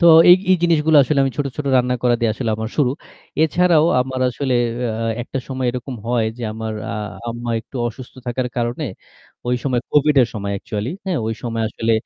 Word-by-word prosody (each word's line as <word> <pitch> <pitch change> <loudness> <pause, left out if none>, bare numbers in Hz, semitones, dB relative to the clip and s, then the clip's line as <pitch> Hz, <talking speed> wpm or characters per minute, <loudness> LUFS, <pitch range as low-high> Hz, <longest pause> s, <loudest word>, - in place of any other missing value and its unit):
তো 170 - +5 0.2
এই, 180 - +10
এই 185 - +6
জিনিসগুলা 160 -2 +4
আসলে 150 0 0
আমি 135 - -1
ছোট, 140 - +1
ছোট 150 -2 -4
রান্না 125 0 +2
করা 120 -1 +4
দিয়ে 115 -2 +2
আসলে 120 -2 -2
আমার 110 0 -3
শুরু। 135 -5 +3 0.5
এছাড়াও 165 0 +4
আমার 130 0 -3
আসলে 130 +1 -1 0.3
অ্যা 115 -1 -2 0.2
একটা 135 - -5
সময় 130 -1 -2
এরকম 125 +1 -5
হয় 120 -2 +2
যে - - -6
আমার 110 0 -4 0.2
আ - - -3 0.4
আম্মা 120 0 -4
একটু 130 - -11
অসুস্থ 120 +2 -8
থাকার 125 +1 -1
কারণে 120 +5 -1 0.6
ওই 125 0 +1
সময় 125 -3 0
কোভিডের 145 -4 +4
সময় 100 -1 -3
একচুয়ালি, 105 +6 -4
হ্যাঁ? 185 -4 -1
ওই 110 - -1
সময় 115 -2 -2
আসলে, 115 +1 -1
125 Hz, 195 wpm, -20 LUFS, 115-145 Hz, 0.6 s, এই